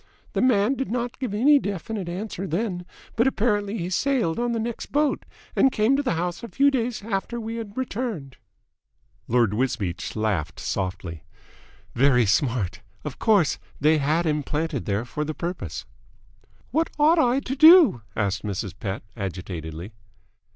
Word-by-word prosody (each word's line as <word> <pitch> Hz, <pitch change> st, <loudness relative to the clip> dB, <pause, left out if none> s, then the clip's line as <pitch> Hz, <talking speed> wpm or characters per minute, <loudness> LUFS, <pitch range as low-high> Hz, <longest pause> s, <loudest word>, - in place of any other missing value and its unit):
The -, -, 0 dB
man 245 Hz, -1 st, +3 dB
did 270 Hz, 0 st, -3 dB
not 240 Hz, +1 st, -3 dB
give 255 Hz, -5 st, -2 dB
any 275 Hz, +8 st, +5 dB
definite 200 Hz, -2 st, -4 dB
answer 195 Hz, +1 st, -4 dB
then, 180 Hz, 0 st, -2 dB, 0.3 s
but 235 Hz, +3 st, +3 dB
apparently 210 Hz, -4 st, 0 dB
he 180 Hz, -1 st, -3 dB
sailed 235 Hz, -6 st, +1 dB
on 240 Hz, 0 st, 0 dB
the 230 Hz, -, -1 dB
next 230 Hz, +1 st, -4 dB
boat, 295 Hz, 0 st, 0 dB, 0.3 s
and 270 Hz, -, +5 dB
came 220 Hz, +5 st, +3 dB
to 280 Hz, -, +1 dB
the 260 Hz, -11 st, 0 dB
house 175 Hz, +1 st, -2 dB
a 235 Hz, -, -6 dB
few 280 Hz, +4 st, +3 dB
days 240 Hz, -4 st, -1 dB
after 220 Hz, +2 st, -2 dB
we 225 Hz, 0 st, -5 dB
had 220 Hz, -1 st, -7 dB
returned." 220 Hz, -, -4 dB, 0.9 s
Lord 115 Hz, -4 st, +3 dB
Wisbeach 105 Hz, -7 st, -2 dB
laughed 100 Hz, -7 st, -1 dB
softly. 90 Hz, -4 st, -4 dB, 0.7 s
"Very 125 Hz, -2 st, +4 dB
smart. 115 Hz, -, 0 dB, 0.2 s
Of 150 Hz, -3 st, -6 dB
course 205 Hz, -, +3 dB, 0.2 s
they 155 Hz, +2 st, +4 dB
had 155 Hz, +4 st, +1 dB
him 150 Hz, -1 st, +1 dB
planted 150 Hz, -2 st, -2 dB
there 105 Hz, +3 st, -1 dB
for 150 Hz, +5 st, -3 dB
the 155 Hz, 0 st, -4 dB
purpose." 175 Hz, +2 st, -5 dB, 0.9 s
"What 325 Hz, +1 st, +1 dB
ought 310 Hz, +3 st, +5 dB
I 250 Hz, -2 st, +3 dB
to 265 Hz, 0 st, -3 dB
do?" 315 Hz, -, +8 dB
asked 100 Hz, -2 st, 0 dB
Mrs. 100 Hz, -3 st, -4 dB
Pett 100 Hz, -2 st, -4 dB
agitatedly. 90 Hz, -3 st, -6 dB
180 Hz, 160 wpm, -24 LUFS, -, 0.9 s, do